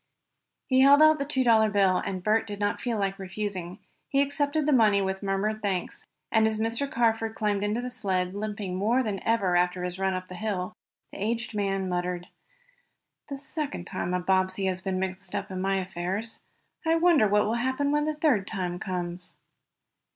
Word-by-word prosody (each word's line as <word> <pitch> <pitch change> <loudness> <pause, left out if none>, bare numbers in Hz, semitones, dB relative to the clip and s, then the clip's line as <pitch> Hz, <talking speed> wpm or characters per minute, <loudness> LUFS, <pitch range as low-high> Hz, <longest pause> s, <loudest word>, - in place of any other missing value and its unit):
He 260 -1 +3
held 280 +2 +7
out 310 -1 +6
the 280 - -1
two 265 -3 +1
dollar 220 -3 +5
bill, 195 -2 +3
and 185 -2 -3
Bert 215 +2 +2
did 205 -1 -6
not 205 0 -1
feel 235 -3 -1
like 195 0 -1
refusing. 190 -2 -4 0.3
He 275 - +2
accepted 285 +2 +1
the 300 - +2
money 215 -5 +5
with 190 0 -2
murmured 205 +2 -1
thanks, 190 -3 -3 0.2
and 220 -1 +4
as 220 -1 -2
Mr. 230 +5 -1
Carford 225 -1 +1
climbed 205 -2 0
into 210 +3 0
the 250 - -4
sled, 185 -5 -1
limping 205 -2 -4
more 225 +7 +2
than 205 -4 -3
ever 200 -6 +1
after 180 0 +1
his 180 +1 -4
run 190 -1 +1
up 185 0 -5
the 185 - -9
hill, 185 -2 -3 0.4
the - - -9
aged 230 +2 -2
man 195 -2 -1
muttered: 180 0 -3 1.0
"The 280 - -4
second 290 - -4
time 180 0 -3
a - - +1
Bobbsey 185 +1 +1
has 185 -1 -1
been 190 -1 -2
mixed 190 0 -3
up 200 0 -3
in 185 0 -3
my 195 +1 +1
affairs. 190 +4 -3 0.4
I 325 0 +3
wonder 330 -8 +4
what 210 +1 +3
will 220 - 0
happen 260 +4 0
when 295 0 +2
the 310 0 -1
third 280 -11 +2
time 180 -2 -3
comes?" 180 -1 -4
205 Hz, 195 wpm, -27 LUFS, 185-235 Hz, 1.0 s, held